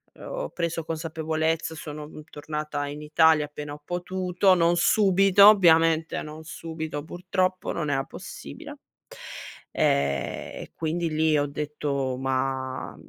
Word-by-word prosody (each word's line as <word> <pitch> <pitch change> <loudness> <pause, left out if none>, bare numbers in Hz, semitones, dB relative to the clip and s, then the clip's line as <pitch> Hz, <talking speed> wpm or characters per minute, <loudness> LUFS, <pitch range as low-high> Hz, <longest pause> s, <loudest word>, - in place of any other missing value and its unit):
uhm, - - -12
ho - - -4
preso 170 -1 -3
consapevolezza 160 0 -2
sono, 150 -1 -7
mhmm, 155 0 -11
tornata 150 -1 -4
in 145 +1 -7
Italia 155 0 +4
appena 150 0 -7
ho 150 - -11
potuto 180 +2 +1
non 170 -1 +3
subito, 195 +1 +5
ovviamente 165 -5 +4
non 155 +1 -9
subito, 160 0 -6
purtroppo. 185 +2 -1
Non 155 -3 -2
era 135 -1 +1
possibile. - - -9 0.9
Eh 70 -1 0
e - - -10
quindi 165 +1 -2
lì 155 0 +2
ho 145 0 +1
detto: 140 -3 -3
"Ma 130 0 -2
160 Hz, 130 wpm, -26 LUFS, 145-170 Hz, 0.9 s, subito